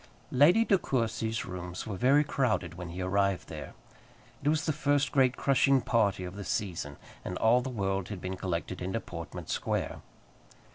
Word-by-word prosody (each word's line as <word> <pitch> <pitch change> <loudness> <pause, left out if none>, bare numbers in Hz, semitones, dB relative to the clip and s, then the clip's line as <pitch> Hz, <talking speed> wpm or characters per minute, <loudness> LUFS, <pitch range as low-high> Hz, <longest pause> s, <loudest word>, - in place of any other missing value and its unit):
Lady 170 - +6
De 195 -4 +4
Courcy's 115 -4 -1
rooms 90 -1 -6
were 105 - -4
very 135 +8 +4
crowded 120 - 0
when 90 0 -7
he 90 +2 -4
arrived 100 0 +1
there. - - -8 0.7
It 145 - +2
was 155 0 +1
the 155 - +1
first 145 -2 +1
great 130 -2 +3
crushing 135 0 +4
party 105 -6 +1
of 90 +1 -6
the 100 - -6
season, 85 -9 -3 0.3
and 90 - -4
all 120 +3 +4
the 130 - -4
world 95 -5 -2
had 105 -3 -5
been 95 +1 -4
collected 90 -1 -3
into 95 +5 -1
Portman 85 -6 -7
Square. - - -2
105 Hz, 175 wpm, -30 LUFS, 90-135 Hz, 0.7 s, Lady